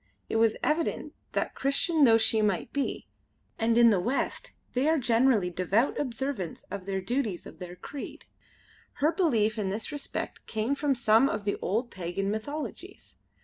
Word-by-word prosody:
It - - 0
was 225 -1 +4
evident 320 +2 0 0.2
that, - - -1
Christian 285 +3 +2
though 225 -2 +6
she 220 -1 +3
might 205 +1 0
be 280 -1 -2 0.5
and 230 0 +2
in 235 -1 +7
the 200 - +3
West 245 +10 -2 0.2
they 260 +5 +2
are 320 - +3
generally 230 -6 +3
devout 190 +8 +1
observants 255 - -3
of 195 -1 -6
the 195 -1 -1
duties 220 -3 -2
of - - -12
their 180 -1 -7
creed 275 +9 -8 0.7
her 300 +3 +2
belief 225 - +1
in 195 -2 -1
this 215 +9 -3
respect 290 -1 -4
came 220 +5 -1
from 280 -1 +1
some 235 +2 +4
of 205 -1 -3
the 200 - 0
old 230 +6 -1
pagan 190 +2 -3
mythologies. 285 +8 -6
225 Hz, 165 wpm, -28 LUFS, 200-275 Hz, 0.7 s, in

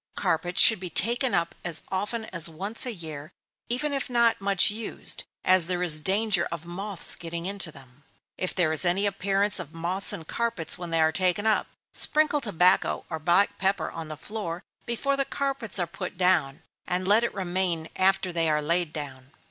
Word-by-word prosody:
Carpets 175 +3 0
should 220 -3 +7
be 180 -1 -6
taken 240 - +3
up 170 -1 -1
as 170 -3 -2
often 210 +4 -2
as 170 -1 +1
once 200 +10 -2
a - - -2
year, 155 -6 -8 0.4
even 280 +5 -1
if 275 -2 -2
not 235 -3 +2
much 195 0 +4
used, 220 +1 -4 0.2
as 185 -3 +5
there 180 -1 -1
is 155 -3 +5
danger 195 +1 +2
of 170 -1 -6
moths 190 +2 0
getting 170 0 -5
into 195 -3 -1
them. 130 0 -17 0.3
If 185 - -4
there 170 -4 +2
is 155 - +4
any 185 +3 +1
appearance 200 0 +1
of 165 -2 -8
moths 180 +4 0
in 160 - -6
carpets 215 -6 -1
when 175 -1 -7
they 165 -1 +1
are 160 0 +3
taken 185 +4 0
up, 220 -1 +2 0.3
sprinkle 305 -1 +3
tobacco 185 -5 +2
or 160 - -3
black 175 +5 +2
pepper 195 +1 0
on 165 -1 -7
the 155 -1 -7
floor 185 -2 -5 0.2
before 275 +4 -1
the 275 - 0
carpets 275 -6 -2
are 175 - +1
put 180 +2 -7
down, 160 -7 +1 0.2
and 180 +1 -2
let 215 +4 +4
it 235 - -1
remain 180 -3 -1
after 190 -1 +1
they 165 -1 +1
are 150 0 +2
laid 170 +2 0
down. 135 -4 -8
185 Hz, 190 wpm, -26 LUFS, 165-205 Hz, 0.4 s, should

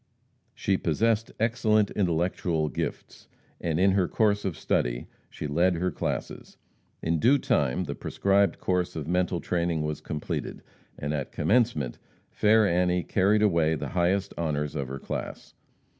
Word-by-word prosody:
She 95 -1 +1
possessed 110 +7 +1
excellent 110 -2 +2
intellectual 85 -3 0
gifts, - - -5 0.3
and 80 -1 -1
in 95 +1 +5
her 95 -2 +2
course 105 0 +1
of 90 -5 -2
study - - -1 0.2
she - - -7
led 85 +5 +2
her 90 +2 -1
classes. - - -4 0.5
In 80 0 +1
due 130 - +5
time 115 - +1
the - - -4
prescribed 100 0 +1
course 90 -1 -1
of 80 -2 -4
mental 90 0 0
training 85 -3 -1
was 75 0 -3
completed, 75 -1 -4 0.3
and 75 +1 -3
"at 70 -3 -3
commencement," 110 - +1 0.3
fair 110 +1 +4
Annie 90 0 +1
carried 105 +2 +2
away 85 -6 +3
the 75 - -5
highest 95 +2 0
honors 75 -3 -1
of 70 - -3
her 65 +1 -5
class. - - -6
90 Hz, 145 wpm, -27 LUFS, 80-100 Hz, 0.5 s, in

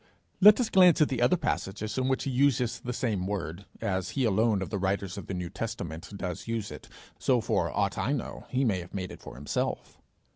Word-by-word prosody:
Let 210 +4 +8
us 245 - 0
glance 180 -3 +6
at 155 - +4
the 125 -3 -1
other 125 +9 +4
passages 110 - -2
in 130 0 0
which 130 0 +1
he 135 - -2
uses 125 -2 +2
the 125 - -4
same 110 -7 -1
word: 95 -2 -4 0.2
as 95 -2 -1
he 135 - +2
alone 110 -1 +2
of - - -7
the 100 - -1
writers 95 0 -1
of 100 - -7
the 95 - -3
New 90 -1 -4
Testament 90 -6 -5
does 90 +1 -5
use 115 -5 -2
it, 75 - -10 0.3
so, - - +3
for - - 0
aught - - -1
I - - 0
know, - - -4
he 130 +1 +1
may 100 -6 +1
have 90 +2 -9
made 95 -1 -3
it - - -11
for - - -10
himsef. 75 - -3
105 Hz, 225 wpm, -29 LUFS, 95-130 Hz, 0.3 s, Let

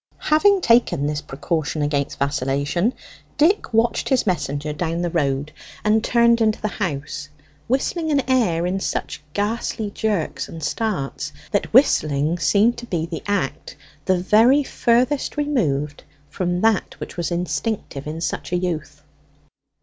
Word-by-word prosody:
Having 390 +5 +5
taken 230 - +3
this 150 0 -1
precaution 150 +1 -2
against 145 -1 -1
vacillation, 140 - 0 0.4
Dick 325 - +3
watched 230 +1 +1
his 265 -3 +2
messenger 150 -5 -1
down 165 +2 -2
the 175 - -1
road, 140 +1 0 0.3
and 215 +1 +3
turned 235 -1 +4
into 215 -1 +2
the 215 - -1
house 155 -5 -4 0.4
whistling 315 +6 0
an 280 -4 +1
air 215 -11 +2
in 185 +2 -1
such 175 - -3
ghastly 210 0 -2
jerks 160 -12 -2
and 160 -1 -8
starts, 180 -3 -2 0.2
that - - 0
whistling 155 +3 +3
seemed 215 +7 +3
to 240 - -9
be 170 -6 -1
the 165 -1 -6
act 195 -9 -2 0.3
the 185 - +3
very 225 +10 +4
furthest 255 +4 +1
removed 150 - -1 0.3
from 175 +2 -1
that 220 -3 +1
which - - -7
was 170 -2 -2
instinctive 175 -3 -3
in 160 +2 -5
such - - -3
a 180 - +2
youth. 155 -5 -4
180 Hz, 140 wpm, -22 LUFS, 150-230 Hz, 0.4 s, Having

